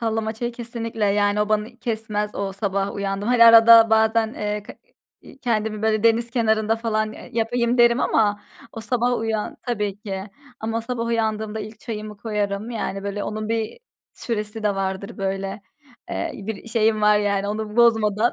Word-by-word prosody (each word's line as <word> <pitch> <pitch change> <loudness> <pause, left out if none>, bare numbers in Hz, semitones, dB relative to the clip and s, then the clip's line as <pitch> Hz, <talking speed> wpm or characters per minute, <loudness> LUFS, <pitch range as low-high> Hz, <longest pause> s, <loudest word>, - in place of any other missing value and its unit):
sallama 225 -1 -1
çayı 240 +2 -4
kesinlikle 230 -2 -4
yani, 205 +1 +2
o 210 - 0
bani 215 +3 -1
kesmez 215 -3 -3
o. 195 -1 -3
Sabah 195 0 -2
uyandım 200 +2 -3
hani, 245 -2 +6
arada 230 0 +8
bazen, 220 0 +3
eee, 210 0 -3
k - - -11 0.5
i - - -15
kendimi 220 -4 -1
böyle 215 -1 +1
deniz 230 +1 +3
kenarında 220 -2 +1
falan, 215 -1 -1
eee, - - -12
yapayım 235 +1 0
derim 240 +2 +5
ama 205 -2 +2 0.3
o 225 - -7
sabah 245 +1 0
uyan 220 -1 -2
Tabii 210 -4 -2
ki. 195 -2 -5 0.4
Ama 225 +1 -2
sabah 230 0 -3
uyandığımda 220 -1 -1
ilk 215 +1 -9
çayımı 215 -2 -6
koyarım, 210 0 -3
yani, 195 -4 -3
böyle, 200 0 -3
onun 215 +1 -4
bir 225 - -2 0.3
süresi 215 -1 -4
de 210 -1 +1
vardır 195 +1 -4
böyle, 195 +1 -3 0.5
eee, - - -2
bir 215 +2 -7
şeyim 220 -1 +2
var, 210 0 +5
yani, 200 -1 0
onu 215 +1 -4
bozmadan. 225 -1 +3
220 Hz, 165 wpm, -22 LUFS, 210-230 Hz, 0.5 s, arada